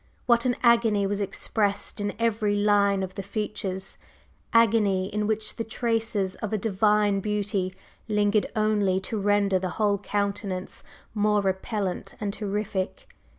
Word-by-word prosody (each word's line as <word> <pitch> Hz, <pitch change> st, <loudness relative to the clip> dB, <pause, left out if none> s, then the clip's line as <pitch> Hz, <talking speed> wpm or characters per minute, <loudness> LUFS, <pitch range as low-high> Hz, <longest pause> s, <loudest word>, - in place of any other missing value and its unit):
What 235 Hz, 0 st, +3 dB
an 245 Hz, -1 st, +2 dB
agony 230 Hz, -4 st, +4 dB
was 205 Hz, +1 st, -1 dB
expressed 205 Hz, +1 st, -1 dB
in 205 Hz, 0 st, -1 dB
every 220 Hz, -2 st, +1 dB
line 205 Hz, -1 st, +3 dB
of 185 Hz, 0 st, -5 dB
the -, -, -5 dB
features! 195 Hz, -2 st, -4 dB, 0.5 s
agony 210 Hz, -5 st, +3 dB
in 210 Hz, 0 st, 0 dB
which 215 Hz, 0 st, -1 dB
the 230 Hz, -, -1 dB
traces 225 Hz, -4 st, -1 dB
of 215 Hz, -, -4 dB
a 215 Hz, -, +1 dB
divine 210 Hz, 0 st, +2 dB
beauty 200 Hz, -2 st, -1 dB, 0.3 s
lingered 210 Hz, 0 st, +2 dB
only 210 Hz, -3 st, +2 dB
to 215 Hz, +3 st, -3 dB
render 200 Hz, -1 st, +2 dB
the 185 Hz, 0 st, -2 dB
whole 205 Hz, -2 st, +2 dB
countenance 200 Hz, -2 st, -3 dB, 0.3 s
more 210 Hz, -1 st, +2 dB
repellent 190 Hz, 0 st, -2 dB
and 205 Hz, -2 st, -2 dB
terrific! 205 Hz, -, -3 dB
205 Hz, 140 wpm, -26 LUFS, 195-215 Hz, 0.5 s, agony